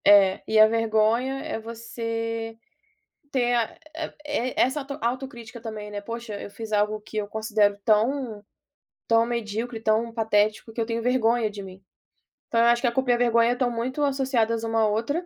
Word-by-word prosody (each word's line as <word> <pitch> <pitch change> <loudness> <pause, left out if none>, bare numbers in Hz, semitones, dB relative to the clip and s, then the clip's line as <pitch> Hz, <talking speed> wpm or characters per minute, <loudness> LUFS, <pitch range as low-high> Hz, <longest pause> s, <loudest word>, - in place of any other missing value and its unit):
É, 200 -2 +6
e 220 - +3
a 215 - +9
vergonha 225 +4 +1
é - - -4
você 230 0 -4 0.8
ter, 245 -2 +2
a 235 -2 +1 0.5
é 290 -4 -1
é - - -3
essa 265 +4 +1
auto 275 0 -6
autocrítica 240 -1 -4
também, 215 -2 -6
né: 205 0 -5
"Poxa, 230 -1 -6
eu - - -8
fiz 220 +1 -8
algo 210 +1 +1
que 215 +1 -11
eu 210 -1 -1
considero 210 -1 +1
tão 225 0 +1 0.6
tão 230 0 +4
medíocre, 230 0 -3
tão 225 +1 +1
patético 215 0 +1
que 230 - -4
eu 225 - 0
tenho 230 0 -2
vergonha 235 -2 +2
de 205 -1 -8
mim." 190 0 -12 0.7
Então 230 - +1
eu 235 - +5
acho 240 0 +4
que 260 - +2
a - - +2
culpa 260 +1 +1
e - - +6
a - - +2
vergonha 235 0 +3
estão 245 -1 0
muito 255 +5 -2
associadas 260 -5 +1
uma 225 0 +1
à 220 - +4
outra. 235 +11 -1
230 Hz, 190 wpm, -25 LUFS, 215-240 Hz, 0.8 s, a